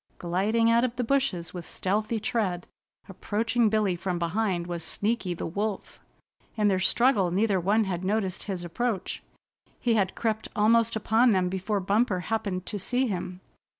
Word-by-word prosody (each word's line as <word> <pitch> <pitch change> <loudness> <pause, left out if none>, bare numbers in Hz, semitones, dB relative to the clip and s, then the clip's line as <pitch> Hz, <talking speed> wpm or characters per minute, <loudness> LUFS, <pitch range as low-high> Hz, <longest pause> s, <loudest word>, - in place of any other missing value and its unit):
Gliding 210 +7 +1
out 235 +1 +4
of 250 -1 -1
the 250 - -1
bushes 230 -10 0
with 175 -2 -6
stealthy 215 +4 -1
tread, 200 -5 -1 0.4
approaching 225 +4 0
Billy 210 -4 +1
from 180 0 -3
behind 175 +1 -1
was 170 -1 -4
Sneaky 205 0 -1
the - - -5
Wolf. 200 +3 -4 0.6
In 210 -1 +3
their 190 -2 +2
struggle 210 -1 +3
neither 195 +2 +1
one 205 +5 +2
had 185 -3 -3
noticed 190 -1 -1
his 190 -4 -4
approach. 195 +2 -2 0.6
He 235 - +1
had 195 -4 +1
crept 220 -1 -1
almost 230 +2 +3
upon 220 +2 +3
them 185 -1 +1
before 190 +3 -1
Bumper 200 0 +1
happened 200 -3 -2
to 205 - -4
see 250 +7 0
him. 185 -4 -4
205 Hz, 160 wpm, -27 LUFS, 185-225 Hz, 0.6 s, out